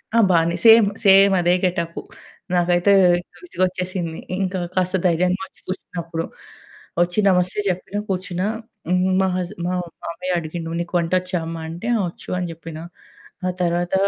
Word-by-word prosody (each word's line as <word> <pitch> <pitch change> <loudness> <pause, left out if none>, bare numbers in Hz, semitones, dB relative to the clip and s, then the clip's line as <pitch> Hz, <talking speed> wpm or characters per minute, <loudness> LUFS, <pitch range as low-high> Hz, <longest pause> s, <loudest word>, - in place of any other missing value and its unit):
ఆ! - - +6
బానే 170 0 +3
same 225 -2 +8 0.2
సేమదే 195 -3 +6
getup. 170 -2 -2 0.5
నాకైతే 175 +2 +3 0.5
విసుగొచ్చేసింది. 185 - -2 0.2
ఇంకా 190 0 -1 0.2
కాస్త 185 0 +1
ధైర్యంగొచ్చి 180 +2 0
కూర్చున్నప్పుడు 170 -3 -4 0.8
ఒచ్చి 175 +4 -2
నమస్తే 180 +1 +1
జెప్పిన 185 +2 -2
కూర్చున్నా. 185 0 -2 0.4
హ్మ్. 180 +1 +2
మా 190 - +2
హస్ 180 -1 -3
మా 180 - -1 0.3
మామయ్య 180 +2 -3
అడిగిండు 165 0 -5
నీకు 175 +1 -5
వంటొచ్చా 185 +2 0
అమ్మ 165 0 -5
అంటే, 170 +7 -6
ఆ - - -1
ఒచ్చు - - -13
అని 180 - -2
జెప్పిన. 165 -1 -9 0.7
ఆ - - +2
తర్వాత 175 0 0
180 Hz, 130 wpm, -21 LUFS, 170-185 Hz, 0.8 s, same